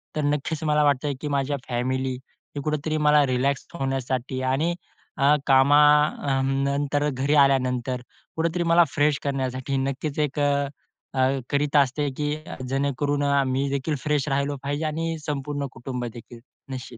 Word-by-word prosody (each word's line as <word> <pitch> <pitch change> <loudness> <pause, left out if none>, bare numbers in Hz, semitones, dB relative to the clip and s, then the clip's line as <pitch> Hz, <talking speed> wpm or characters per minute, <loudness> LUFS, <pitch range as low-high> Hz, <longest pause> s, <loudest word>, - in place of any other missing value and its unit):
तर 155 - 0
नक्कीच 150 +2 -1
मला 150 0 +3
वाटतं, 145 0 +2
की 150 - -3
माझ्या 140 0 0
फॅमिली 130 +2 -1 0.4
ही 145 - -3
कुठेतरी 155 +1 -1
मला 150 -1 +4
रिलॅक्स 130 +1 0
होण्यासाठी 130 -3 -2
आणि 160 +6 +1 0.4
अ, 140 +2 +5
कामानंतर 140 0 +3
घरी 140 +2 0
आल्यानंतर 125 -2 0 0.4
कुठेतरी 165 +2 0
मला 170 +1 +5
फ्रेश 145 -1 +2
करण्यासाठी 135 -1 -2
नक्कीच 140 +3 -2
एक 150 0 -1
अ, 140 -1 +2 0.5
अ, 130 - 0 0.3
करीत 145 0 0
असते 145 +2 -2
की 150 0 -1 0.3
जेणेकरून 140 +1 0
अ, 140 -1 +3
मी 135 +2 0
देखील 140 +3 -1
फ्रेश 150 -2 0
राहिलो 140 +1 0
पाहिजे 145 +3 -2
आणि 165 +1 -2
संपूर्ण 145 -1 -3
कुटुंब 125 +1 -5
देखील 120 0 -10 0.3
निश्चित. 130 -2 -7
140 Hz, 140 wpm, -24 LUFS, 135-150 Hz, 0.5 s, अ